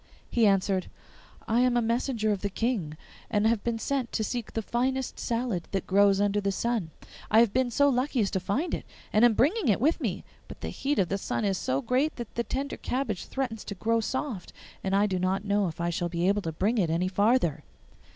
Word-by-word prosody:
He 230 -3 +4
answered, 195 -1 +1 0.6
'I 225 +2 +2
am 250 -1 +3
a - - +3
messenger 230 -1 0
of 200 -2 -1
the 200 - -1
King, 195 -8 -2 0.3
and 205 0 +1
have 225 -2 +2
been 235 -1 -1
sent 260 +2 -2
to 220 - 0
seek 235 0 -3
the 225 - -2
finest 260 +3 -1
salad 230 -7 -2
that 195 - -1
grows 200 0 +4
under 205 0 +2
the 200 0 0
sun. 225 -3 -1 0.4
I 220 - +6
have 230 -3 +4
been 255 -1 +2
so 285 +4 +3
lucky 260 0 +1
as 200 - 0
to 190 - 0
find 205 - -1
it, - - -2 0.3
and 215 - +4
am 240 -2 +6
bringing 320 - +2
it 205 - +3
with 315 +7 +2
me; 205 -8 -2 0.2
but - - -11
the - - -3
heat 285 +2 -2
of 180 -3 +2
the 195 - -1
sun 210 - -2
is 195 -2 0
so 135 +2 -1
great 270 +5 +1
that 240 -3 -7
the 235 - -1
tender 275 +3 -3
cabbage 245 -7 -2
threatens 250 -5 -3
to 200 - -5
grow 230 +4 +1
soft, 240 -3 -3 0.3
and 195 0 0
I 200 +1 +4
do 190 -3 -1
not 190 +2 0
know 205 -1 +2
if 165 - -7
I 170 0 0
shall 175 +1 -2
be 170 +1 0
able 205 +1 +2
to 165 - -3
bring 210 +9 0
it 175 -5 +2
any 170 +3 +1
farther. 190 - +2
215 Hz, 230 wpm, -28 LUFS, 195-245 Hz, 0.6 s, I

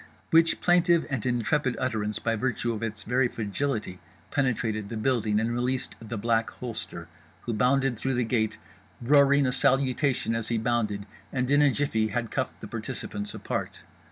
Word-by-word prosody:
_" - - -18 0.3
which 165 +1 +4
plaintive 175 -1 +4
and 130 -4 -1
intrepid 125 +2 +1
utterance 110 -4 -1
by 115 0 0
virtue 120 0 -1
of 110 - -5
its 110 -1 -3
very 125 +2 +2
fragility 110 -3 -3 0.3
penetrated 115 -6 0
the 115 - -4
building 110 -3 +1
and 115 +2 0
released 125 +2 -1
The 115 +1 -5
Black 115 +1 +1
Holster, 120 -3 -6 0.3
who 120 - -3
bounded 125 +2 +2
through 135 -1 -1
the 125 - +1
gate, 110 -2 0 0.4
roaring 140 +2 +5
a 130 - +2
salutation 130 -1 +1
as 115 -1 -2
he 115 - 0
bounded, 110 -3 0 0.3
and 130 0 -1
in 145 +1 +5
a 145 - +6
jiffy 115 -5 0
had 115 +2 -3
cuffed - - -3
the - - -7
participants 105 0 -5
apart. - - -4
120 Hz, 170 wpm, -27 LUFS, 110-135 Hz, 0.4 s, a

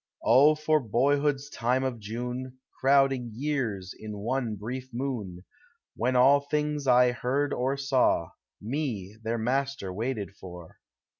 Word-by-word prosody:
O 140 +6 +6
for 155 0 +2
boyhood's 140 +4 +1
time 130 -1 0
of 130 -3 -2
June, 125 +4 -5 0.2
Crowding 135 -2 +3
years 120 -9 -2
in 105 -1 -8
one 115 +1 -2
brief 125 +5 -6
moon, 115 -8 -4 0.5
When 125 +2 0
all 135 +3 +6
things 150 0 -2
1 125 0 +5
heard 135 +4 -1
or 130 +3 -1
saw. 130 -11 +1 0.3
Me, 110 -5 -4
their 115 +1 -2
master, 130 -4 -1
waited 110 -1 -3
for. 90 -3 -11
125 Hz, 130 wpm, -28 LUFS, 110-140 Hz, 0.5 s, O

